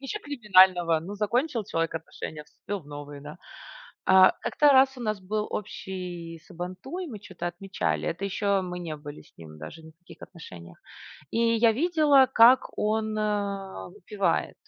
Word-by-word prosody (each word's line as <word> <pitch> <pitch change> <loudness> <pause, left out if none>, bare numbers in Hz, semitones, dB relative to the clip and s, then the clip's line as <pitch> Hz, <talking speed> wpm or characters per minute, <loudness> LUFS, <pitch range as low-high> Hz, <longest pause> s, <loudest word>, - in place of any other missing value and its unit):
Ничё 275 +10 -5
криминального. 185 - +4
Ну 185 +6 -7
закончил 235 +4 -1
человек 165 -4 -2
отношения, 160 -1 -8
вступил 205 +6 -7
в 145 - -21
новые, 145 0 -9
да? 150 +2 -10 0.7
А, 190 0 +7
как-то 295 - +2
раз 265 0 +4
у - - -9
нас 215 -2 -2
был 210 +3 -3
общий 180 -4 -6
сабантуй, 185 - -7
мы 225 -8 -8
чё-то 180 -3 -7
отмечали. 185 +3 -3
Это 175 +4 -4
еще 200 +1 -3 0.2
мы 180 -1 -6
не 160 -3 -5
были 145 0 -10
с - - -24
ним 80 -2 -12
даже 80 - -10
ни 160 - -13
в 160 - -49
каких 175 - -16
отношениях. 85 - -12 0.5
И - - -2 0.2
я 225 0 +4
видела, 295 -1 +4
как 240 +3 +7 0.2
он, 215 0 -1
э, 200 -2 -3
выпивает. 200 -3 -2
190 Hz, 165 wpm, -26 LUFS, 165-220 Hz, 0.7 s, А